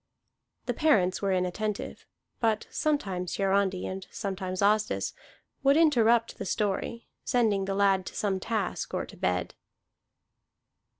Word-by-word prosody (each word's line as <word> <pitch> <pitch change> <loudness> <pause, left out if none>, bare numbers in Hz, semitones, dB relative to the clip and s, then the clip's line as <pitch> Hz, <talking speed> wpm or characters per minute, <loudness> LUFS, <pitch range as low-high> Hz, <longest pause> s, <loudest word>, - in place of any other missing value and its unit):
The - - -1
parents 200 - +2
were 200 -1 +1
inattentive; 190 +3 -2 0.3
but 220 -2 +1
sometimes 195 - -1
Hiarandi, 195 -1 +1
and 190 0 -5
sometimes 190 -2 -3
Asdis, 215 +1 +2 0.5
would 275 +1 +4
interrupt 235 -7 +3
the 200 - -4
story, 210 +4 -2 0.2
sending 215 -6 +2
the 195 0 -2
lad 195 -2 +3
to - - -7
some 195 -2 0
task 220 +1 -2
or - - -1
to - - -13
bed. 90 0 -1
200 Hz, 125 wpm, -28 LUFS, 190-225 Hz, 0.5 s, would